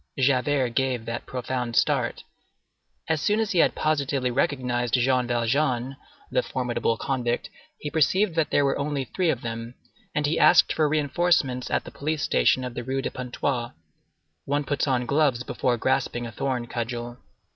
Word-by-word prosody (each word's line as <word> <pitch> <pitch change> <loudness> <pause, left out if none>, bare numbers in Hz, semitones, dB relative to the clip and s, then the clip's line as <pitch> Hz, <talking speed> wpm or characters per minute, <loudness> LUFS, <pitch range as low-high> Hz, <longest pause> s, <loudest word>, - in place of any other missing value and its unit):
Javert 135 0 +2
gave 125 -1 -1
that 115 +1 -5
profound 125 -1 -3
start. - - +1 0.8
As 160 -2 0
soon 210 +1 +2
as 220 -1 0
he 180 - +2
had - - +4
positively 140 -4 0
recognized 125 -2 0
Jean 125 0 +2
Valjean, 125 +2 0 0.4
the - - +2
formidable 120 -2 -1
convict, 120 -2 -2 0.3
he 150 - -6
perceived 180 +5 +2
that 160 -1 +1
there 145 - +3
were 135 - 0
only 140 -1 -2
three 180 +7 0
of - - 0
them, 115 +1 -5 0.4
and 150 - +1
he 150 +3 +1
asked - - +6
for 155 -2 +2
reinforcements 145 -3 +1
at - - 0
the - - -10
police 155 +1 -2
station 130 - +3
of 125 -1 -5
the - - -5
Rue 135 +2 -2
de - - -2
Pontoise. 125 -1 -3 0.7
One 145 +1 0
puts 145 +1 -1
on 125 -2 +1
gloves 140 -3 +2
before 125 0 0
grasping 125 -1 0
a 115 - -6
thorn 125 +1 -2
cudgel. 120 +1 -5
130 Hz, 170 wpm, -25 LUFS, 120-145 Hz, 0.8 s, asked